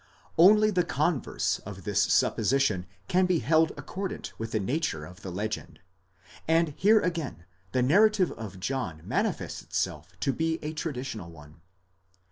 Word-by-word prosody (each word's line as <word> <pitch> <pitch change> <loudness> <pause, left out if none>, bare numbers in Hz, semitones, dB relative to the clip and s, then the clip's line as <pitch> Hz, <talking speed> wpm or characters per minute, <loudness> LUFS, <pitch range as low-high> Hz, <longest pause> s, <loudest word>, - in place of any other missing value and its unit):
Only 210 +5 +6
the 180 -3 +2
converse 170 -3 0
of 95 -2 -9
this 100 0 +1
supposition 105 -3 +2 0.2
can 185 +1 +3
be 180 -2 +3
held 160 +4 +3
accordant 195 0 -5
with 115 0 -4
the 110 - 0
nature 105 - -1
of 90 +5 -13
the 95 - -6
legend, 105 +4 -4 0.7
and 165 0 +3
here 205 +9 +4
again 165 - -3 0.3
the 125 +2 +2
narrative 200 +6 +4
of 100 -4 -8
John 90 -9 -3
manifests - - -1
itself 80 +4 -4
to 135 - +1
be 160 0 0
a 155 +1 -3
tra 160 0 -3
ditional 125 -9 -6
one. 75 -1 -15
135 Hz, 150 wpm, -28 LUFS, -, 0.7 s, Only